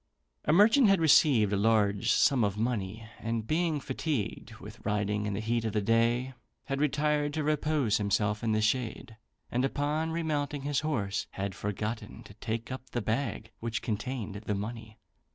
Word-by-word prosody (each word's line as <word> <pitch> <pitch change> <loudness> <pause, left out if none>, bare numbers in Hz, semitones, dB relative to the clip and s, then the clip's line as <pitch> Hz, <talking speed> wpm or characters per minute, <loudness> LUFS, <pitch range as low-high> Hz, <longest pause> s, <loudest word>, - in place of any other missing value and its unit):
[A] - - -4
A - - +6
merchant 220 - +6
had 195 -2 +4
received 135 -9 +5
a - - +2
large 105 -2 +2
sum 135 -5 +4
of 100 -1 0
money; 110 -1 -2
and 115 -1 -2
being 160 +2 0
fatigued 135 -4 -3
with - - -12
riding 105 0 0
in 105 - -2
the - - -2
heat 115 +1 0
of 110 -2 -2
the 105 - +1
day, 115 +4 +2 0.3
had 135 0 -2
retired 150 0 +1
to 155 - -1
repose 150 -6 +1
himself 105 +1 0
in 115 - +1
the 110 0 +2
shade; 115 -1 -1 0.3
and 125 +2 +1
upon 145 +4 0
remounting 150 -4 -2
his 145 -1 0
horse, 105 -10 -2
had 100 0 -3
forgotten 105 +2 -4
to - - -13
take 115 +3 -4
up 130 0 -7
the 120 - -2
bag 110 -1 -2
which 115 -1 -3
contained 110 -1 -3
the 105 0 -3
money. 110 +2 -6
115 Hz, 175 wpm, -30 LUFS, 105-145 Hz, 0.3 s, A